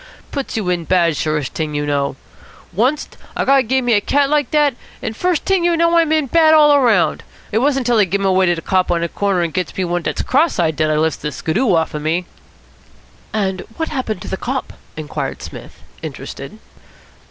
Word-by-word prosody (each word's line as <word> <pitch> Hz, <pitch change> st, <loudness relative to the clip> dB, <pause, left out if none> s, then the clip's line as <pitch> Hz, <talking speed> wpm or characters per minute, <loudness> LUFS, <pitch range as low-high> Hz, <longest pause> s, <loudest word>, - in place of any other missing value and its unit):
Puts 275 Hz, -5 st, -4 dB
you 210 Hz, -4 st, -2 dB
in 175 Hz, -2 st, -2 dB
bad, 170 Hz, -3 st, +2 dB
surest 150 Hz, -3 st, -2 dB
t'ing 155 Hz, -2 st, -3 dB
you 145 Hz, 0 st, -1 dB
know. 140 Hz, -2 st, -1 dB, 0.6 s
Oncest 255 Hz, +9 st, 0 dB, 0.2 s
a -, -, 0 dB
guy 275 Hz, 0 st, +5 dB
give 260 Hz, +1 st, 0 dB
me 240 Hz, -, +3 dB
a 205 Hz, -, +4 dB
cat 280 Hz, +5 st, +1 dB
like 295 Hz, -3 st, +2 dB
dat, 295 Hz, -4 st, +2 dB, 0.2 s
and 220 Hz, -, -5 dB
first 360 Hz, +3 st, 0 dB
t'ing 385 Hz, -2 st, +2 dB
you 345 Hz, -1 st, +2 dB
know 335 Hz, +1 st, +3 dB
I'm 330 Hz, -2 st, +3 dB
in 310 Hz, -2 st, +2 dB
bad 315 Hz, +3 st, +5 dB
all 295 Hz, -2 st, +6 dB
round. 220 Hz, -9 st, +2 dB, 0.3 s
It 220 Hz, -, +2 dB
wasn't 270 Hz, 0 st, +1 dB
till 240 Hz, -2 st, +3 dB
I 205 Hz, -, +5 dB
give 195 Hz, +2 st, -1 dB
him 195 Hz, -, -2 dB
away 190 Hz, -1 st, +3 dB
to 175 Hz, -, +3 dB
de 165 Hz, -, -7 dB
cop 185 Hz, -1 st, +1 dB
on 170 Hz, -1 st, +1 dB
de 170 Hz, -, 0 dB
corner 195 Hz, -2 st, 0 dB
and 165 Hz, -, -3 dB
gets 185 Hz, -1 st, -3 dB
me 190 Hz, -, 0 dB
one 175 Hz, 0 st, -1 dB
dat's -, -, -2 dB
cross 300 Hz, +4 st, +2 dB
eyed 160 Hz, -3 st, +1 dB
dat 155 Hz, 0 st, +1 dB
I 155 Hz, -, +1 dB
lifts 160 Hz, 0 st, 0 dB
de 150 Hz, -, -3 dB
skiddoo 190 Hz, -, 0 dB
off 160 Hz, -1 st, 0 dB
of 150 Hz, -, -4 dB
me." 165 Hz, +4 st, -1 dB, 1.1 s
"And 190 Hz, -3 st, -1 dB, 0.2 s
what 320 Hz, -, -2 dB
happened 250 Hz, -9 st, -3 dB
to -, -, -8 dB
the 190 Hz, -, -3 dB
cop?" 260 Hz, +5 st, -4 dB, 0.2 s
inquired 155 Hz, -1 st, -5 dB
Psmith, -, -, -11 dB, 0.2 s
interested. -, -, -8 dB
205 Hz, 220 wpm, -18 LUFS, 170-280 Hz, 1.1 s, all